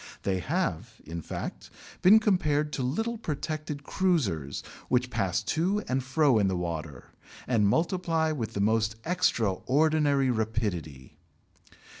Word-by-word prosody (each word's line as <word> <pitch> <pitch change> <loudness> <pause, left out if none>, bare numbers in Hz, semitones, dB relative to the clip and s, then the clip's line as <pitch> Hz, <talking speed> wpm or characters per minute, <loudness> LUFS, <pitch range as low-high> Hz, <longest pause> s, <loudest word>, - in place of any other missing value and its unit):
They 95 -1 0
have, 150 - -2
in 85 +2 -5
fact, - - -6 0.3
been 200 +4 +8
compared 150 -9 +1
to - - -2
little 225 - -1
protected 150 -4 -4
cruisers 110 - 0 0.3
which 125 0 +1
pass 95 -1 0
to 185 - 0
and 130 0 0
fro 135 -2 +3
in 100 - +3
the 95 -1 0
water 80 -6 -5 0.3
and 110 -5 +2
multiply 165 - +1
with 115 -7 -3
the 100 - 0
most 110 +1 +2
extraordinary 145 - +2
rapidity. 105 - -3
130 Hz, 125 wpm, -28 LUFS, 100-160 Hz, 0.3 s, been